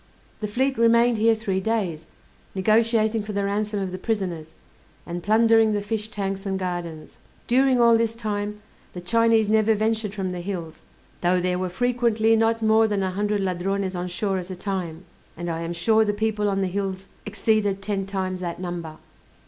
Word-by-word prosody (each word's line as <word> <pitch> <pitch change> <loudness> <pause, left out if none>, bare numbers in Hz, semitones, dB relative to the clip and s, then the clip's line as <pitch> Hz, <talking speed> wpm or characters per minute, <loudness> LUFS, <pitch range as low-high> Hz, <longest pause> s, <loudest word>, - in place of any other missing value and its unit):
The 210 - -3
fleet 260 +4 0
remained 235 0 +4
here 225 +1 +4
three 200 -4 -2
days, 185 -7 -2 0.5
negotiating 220 +2 +2
for 210 0 -6
the 200 0 -1
ransom 205 +1 -1
of 190 -2 -3
the 185 - -6
prisoners, 180 -8 -3 0.5
and 175 0 -5
plundering 225 +2 +4
the 205 - 0
fish 215 0 -3
tanks 195 -2 -4
and 195 -2 -2
gardens. 175 -4 -5 0.3
During 260 +1 +3
all 235 -1 +5
this 230 0 0
time, 210 -2 -4 0.3
the 180 - -7
Chinese 225 +3 +3
never 220 +1 +3
ventured 215 -1 -1
from 190 -2 -2
the 180 -1 -5
hills, 175 -4 -6 0.4
though 180 +1 +3
there 180 0 0
were 185 0 -2
frequently 230 +1 +2
not 225 0 +1
more 220 0 +4
than 205 -2 -1
a 190 - -1
hundred 205 +2 -1
Ladrones 190 +1 -1
on 180 0 -3
shore 190 +2 -1
at 180 0 -8
a 185 - -5
time, 180 -3 -4 0.3
and 175 0 -3
I 165 0 -3
am 170 0 -4
sure 220 +6 +3
the 210 -1 0
people 210 -1 0
on 195 0 0
the 190 - +1
hills 195 0 -3 0.2
exceeded 205 -1 0
ten 195 -2 -2
times 190 -2 -3
that 175 -2 -4
number. 175 -3 -5
205 Hz, 185 wpm, -24 LUFS, 185-220 Hz, 0.5 s, all